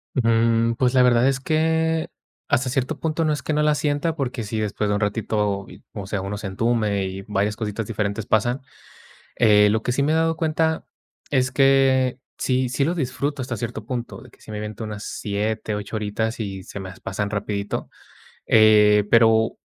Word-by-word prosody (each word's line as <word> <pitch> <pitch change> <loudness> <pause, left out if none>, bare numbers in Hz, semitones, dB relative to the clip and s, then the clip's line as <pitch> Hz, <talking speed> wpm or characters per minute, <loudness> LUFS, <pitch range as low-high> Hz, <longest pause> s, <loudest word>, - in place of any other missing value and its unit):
Mm, 115 -1 +2
pues, 125 +1 +1
la 130 -1 +5
verdad 125 +1 +4
es 135 -1 +1
que, 160 +2 +1 0.4
hasta 135 -3 +1
cierto 135 +3 -2
punto, 160 0 -1
no 155 - +2
es 150 - -4
que 155 - -1
no 150 - +2
la 150 0 +3
sienta 150 +2 -1
porque 125 -5 -3
sí, 110 +1 -3
después 105 0 -1
de 105 - +1
un 105 - -2
ratito, 105 -2 -1 0.3
o 100 -3 -6
sea, 100 -1 -2
uno 100 +1 -4
se 105 - -5
entume 105 -1 0
y 95 +1 -5
varias 105 +1 0
cositas 110 -1 -4
diferentes 105 -1 -2
pasan, 120 +5 +1 0.8
eh, 105 -3 +5
lo 110 +1 0
que 125 - -1
sí 140 - +1
me 150 +2 +2
he - - +2
dado 165 0 +1
cuenta 160 0 0 0.4
es 130 -2 +2
que 135 -1 +3 0.2
sí 130 -1 +1
sí 135 +2 +1
lo 170 +4 0
disfruto, 140 -1 -2
hasta 120 -2 -4
cierto 110 -2 -5
punto, 120 0 -5
de - - -15
que - - -24
sí - - -13
me 105 - -5
aviento 105 +1 -6
unas 105 0 -6
siete, 105 +1 -3
ocho 105 +2 -5
horitas 110 +2 -2
y 95 -3 -4
se 100 - -8
me 95 -1 -7
pasan 105 -1 -3
rapidito, 105 -1 -3 0.6
eh, 105 -1 +6
pero 110 -1 +4
115 Hz, 195 wpm, -23 LUFS, 105-135 Hz, 0.8 s, eh